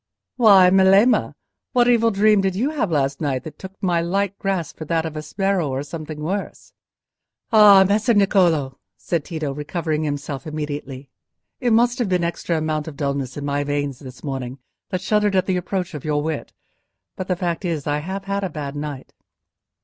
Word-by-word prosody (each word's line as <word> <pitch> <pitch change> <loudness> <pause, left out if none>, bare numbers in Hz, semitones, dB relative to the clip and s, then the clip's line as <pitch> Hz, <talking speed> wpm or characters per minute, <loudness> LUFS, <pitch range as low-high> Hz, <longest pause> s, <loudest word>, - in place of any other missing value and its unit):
"Why, 195 -6 +6
Melema, 195 +5 +4 0.4
what 245 -2 +4
evil 230 -2 +4
dream 210 0 +3
did 190 -1 0
you 255 +9 0
have 275 - -1
last 140 -3 0
night, 135 -4 -1
that 160 - -8
you - - -47
took 190 +1 -11
my 175 -3 +2
light 195 +3 -1
grasp 190 -6 -2
for 155 - -6
that 165 +1 0
of 160 -1 -5
a - - -3
sbirro 190 0 -1
or 135 +1 -2
something 155 0 -7
worse?" 195 +6 -5 0.8
"Ah, 205 -3 +8
Messer 215 +3 +2
Niccolò!" 175 -9 +2 0.2
said 145 - -2
Tito, 155 -4 -4
recovering 155 +2 -3
himself 145 0 -4
immediately; 145 -3 -6 0.5
"it 245 -2 0
must 240 +3 +3
have 235 -5 0
been 180 -1 +1
an - - +2
extra 170 0 -3
amount 155 -1 -2
of 150 -3 -8
dulness 140 -2 -3
in 145 - -4
my 145 0 -1
veins 145 -2 -2
this 130 -3 -12
morning 130 -2 -4 0.3
that 185 - -2
shuddered 210 0 +1
at 185 -1 +2
the 185 -1 0
approach 180 0 -3
of 150 - -7
your 150 -1 0
wit. 155 -2 -4 0.6
But 185 - -5
the 180 - 0
fact 175 0 -3
is, 165 -5 -2
I 145 0 0
have 190 +5 -5
had 200 0 -2
a 190 - -1
bad 145 -3 -6
night." 145 -2 -6
170 Hz, 195 wpm, -21 LUFS, 145-195 Hz, 0.8 s, Ah